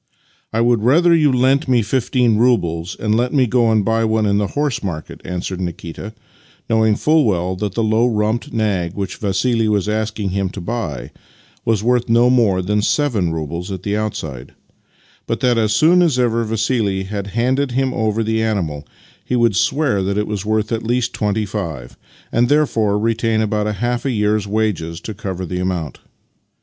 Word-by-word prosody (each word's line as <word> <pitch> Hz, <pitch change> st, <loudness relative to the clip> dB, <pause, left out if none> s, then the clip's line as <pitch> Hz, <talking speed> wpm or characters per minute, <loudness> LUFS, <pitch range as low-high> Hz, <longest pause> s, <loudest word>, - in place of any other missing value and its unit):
" -, -, -36 dB
I 115 Hz, -, 0 dB
would 120 Hz, -2 st, +2 dB
rather 165 Hz, +9 st, +4 dB
you 155 Hz, -4 st, +4 dB
lent 130 Hz, +3 st, +2 dB
me 125 Hz, -3 st, +3 dB
fifteen 120 Hz, 0 st, +1 dB
roubles 90 Hz, -8 st, +1 dB
and 105 Hz, 0 st, 0 dB
let 120 Hz, +5 st, 0 dB
me 130 Hz, -2 st, +4 dB
go 120 Hz, -1 st, +2 dB
and 110 Hz, -3 st, +2 dB
buy 115 Hz, +1 st, +1 dB
one 110 Hz, -1 st, +1 dB
in 100 Hz, 0 st, +2 dB
the 105 Hz, -, 0 dB
horse 145 Hz, -4 st, 0 dB
market," 80 Hz, -6 st, -6 dB
answered 90 Hz, +1 st, -4 dB
Nikita, 85 Hz, +4 st, -6 dB, 0.5 s
knowing 110 Hz, -2 st, +3 dB
fuU 155 Hz, +6 st, +3 dB
well 95 Hz, -5 st, 0 dB
that 100 Hz, 0 st, -3 dB
the 115 Hz, -, +1 dB
low 110 Hz, +2 st, +2 dB
rumped 110 Hz, +4 st, -1 dB
nag 100 Hz, -6 st, -1 dB
which 100 Hz, -2 st, -4 dB
Vassili 110 Hz, +3 st, 0 dB
was 105 Hz, -2 st, +1 dB
asking 105 Hz, -1 st, -2 dB
him 95 Hz, 0 st, -1 dB
to 100 Hz, -, -8 dB
buy 95 Hz, -, -4 dB, 0.5 s
was 110 Hz, -2 st, +1 dB
worth 120 Hz, 0 st, +1 dB
no 120 Hz, +2 st, +4 dB
more 105 Hz, -7 st, +2 dB
than 105 Hz, +3 st, 0 dB
seven 110 Hz, -, +1 dB
roubles 85 Hz, +4 st, -4 dB
at 95 Hz, -1 st, -6 dB
the 100 Hz, 0 st, -1 dB
outside, 80 Hz, -, -5 dB, 0.7 s
but -, -, -1 dB
that 120 Hz, -2 st, +2 dB
as 110 Hz, -1 st, +1 dB
soon 165 Hz, +10 st, +4 dB
as 160 Hz, -7 st, +2 dB
ever 115 Hz, -2 st, +1 dB
Vassili 110 Hz, -3 st, 0 dB
had 100 Hz, 0 st, -5 dB
handed 130 Hz, +2 st, +1 dB
him 130 Hz, 0 st, 0 dB
over 110 Hz, -1 st, 0 dB
the 110 Hz, 0 st, 0 dB
animal 85 Hz, -10 st, -2 dB, 0.4 s
he 125 Hz, -, -2 dB
v/ould 120 Hz, -4 st, +2 dB
swear 130 Hz, -, +1 dB
that 100 Hz, +1 st, -1 dB
it 105 Hz, -, 0 dB
was 105 Hz, -2 st, -4 dB
worth 110 Hz, +1 st, -1 dB
at 115 Hz, -1 st, -1 dB
least 120 Hz, +1 st, -1 dB
twenty 105 Hz, +1 st, -1 dB
five, 85 Hz, -, -5 dB, 0.4 s
and 120 Hz, +1 st, +2 dB
therefore 115 Hz, -9 st, +2 dB
retain 115 Hz, 0 st, 0 dB
about 105 Hz, -1 st, -1 dB
half 120 Hz, +3 st, -1 dB
a 135 Hz, -, 0 dB
year's 105 Hz, -2 st, 0 dB
wages 100 Hz, -6 st, -1 dB
to 110 Hz, -, -7 dB
cover 95 Hz, -3 st, -5 dB
the 90 Hz, +1 st, -4 dB
amount. 90 Hz, -5 st, -3 dB
110 Hz, 185 wpm, -18 LUFS, 100-120 Hz, 0.7 s, rather